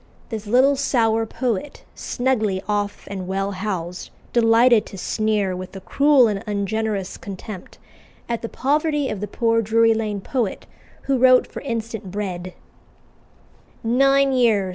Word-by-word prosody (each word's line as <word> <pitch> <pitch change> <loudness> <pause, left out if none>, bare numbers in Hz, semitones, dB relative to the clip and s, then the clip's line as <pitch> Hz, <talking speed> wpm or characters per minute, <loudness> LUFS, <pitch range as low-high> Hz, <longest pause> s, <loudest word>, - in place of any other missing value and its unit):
The 225 -3 -3
little 260 +5 +4
sour 225 -5 +1
poet, 245 +3 -3
snugly 220 -7 -1
off 205 -1 -2
and 190 -2 -6
well 195 +1 -1
housed, 185 -3 -4 0.2
delighted 230 0 +5
to 195 - -10
sneer, 210 -1 0
with 185 +1 -8
a - - -5
cruel 275 +5 +4
and 205 -1 -2
ungenerous 205 -1 -2
contempt, 195 0 -9 0.5
at 235 -1 -2
the 230 - -5
poverty 295 +1 0
of 215 - -4
the 210 - -3
poor 230 +2 +1
Drury 225 +1 +3
Lane 215 -2 -2
poet 225 0 -3 0.4
who 270 -2 0
wrote 255 0 +6
for - - -9
instant 225 -5 -4
bread: 185 -2 -5 1.3
"'Nine 275 +4 +3
years! 225 -7 +2
220 Hz, 140 wpm, -22 LUFS, 200-250 Hz, 1.3 s, wrote